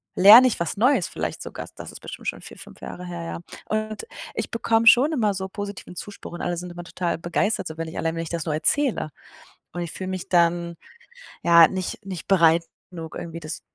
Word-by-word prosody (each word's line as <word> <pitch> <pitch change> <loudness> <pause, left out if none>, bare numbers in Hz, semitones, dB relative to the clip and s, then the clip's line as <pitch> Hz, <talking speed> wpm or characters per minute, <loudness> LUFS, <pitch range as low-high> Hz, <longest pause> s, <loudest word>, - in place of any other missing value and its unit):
lerne 220 +7 +10
ich 240 - -1
was 170 - -2
Neues, 250 +7 +3
vielleicht - - -4
sogar.”, - - -7
das - - -9
ist - - -11
bestimmt - - -9
schon - - -6
4, - - -12
5 - - -13
Jahre 180 - -8
her, 175 -1 -6
ja. 165 - -5 0.3
Und 215 - -3 0.3
ich - - -3
bekomme 230 0 +1
schon 270 +7 +7
immer 215 -8 +1
so 190 0 -4
positiven 200 -2 -7
Zuspruch 205 -4 -8
und 175 - -6
alle 175 - -1
sind 175 +1 -6
immer 175 0 -8
total 175 -2 -2
begeistert 175 +6 -1
so, 160 0 -8
wenn 165 0 -4
ich 160 - -9
allein 165 0 -1
wenn 165 - -2
ich 165 - -7
das 170 -2 -3
nur 155 - -1
erzähle. 225 - +1 0.6
Und 175 - -4
ich 170 - -4
fühle 185 - -6
mich 185 -1 -5
dann, 170 -1 +2 0.7
ja, 170 -1 +8
nicht 190 +3 -4
nicht 185 -4 -7
bereit 170 -3 +5 0.3
genug, 165 -2 -8
irgendwie 165 -1 -6
das 155 0 -6
175 Hz, 220 wpm, -24 LUFS, 170-205 Hz, 0.7 s, lerne